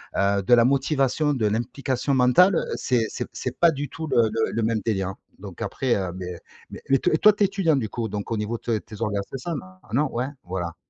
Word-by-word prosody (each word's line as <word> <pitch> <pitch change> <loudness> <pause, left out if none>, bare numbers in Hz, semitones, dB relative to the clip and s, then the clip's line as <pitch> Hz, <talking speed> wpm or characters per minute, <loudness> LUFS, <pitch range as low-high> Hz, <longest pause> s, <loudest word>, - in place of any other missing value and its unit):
heu, 100 0 +2
de 120 - +3
la 120 0 +6
motivation, 140 +2 +1
de 120 -6 0
l'implication 130 +5 -1
mentale, 130 +10 +5
heu, - - 0
c'est 120 -3 +1
c'est - - -5
c'est 130 0 -5
pas 170 -1 +6
du 145 -2 -4
tout 160 -1 -6
le 135 - 0
le 110 +1 -1
le 115 0 -1
même 110 0 +1
délire, 95 -4 0
hein 95 - -8 0.2
donc - - -10
après, 130 -3 0
heu, 95 -3 -2
beh 90 -2 -6 0.3
beh, - - -9
mais 135 -1 +4
tu - - +1
es 205 +5 +5
étudiant 190 -5 +1
du 115 -6 -1
coup? 115 0 -3
Donc 105 +2 -5
au 115 - 0
niveau 110 +2 -2
de 115 -1 -1
tes 110 +2 -12
orga 105 -3 0
c'est 135 - -6
ça? 170 +7 -4 0.3
Ah, - - -22
non? 145 +2 +2
Ouais, 125 +3 -1 0.2
voilà. 90 -2 -4
120 Hz, 235 wpm, -24 LUFS, 105-140 Hz, 0.3 s, la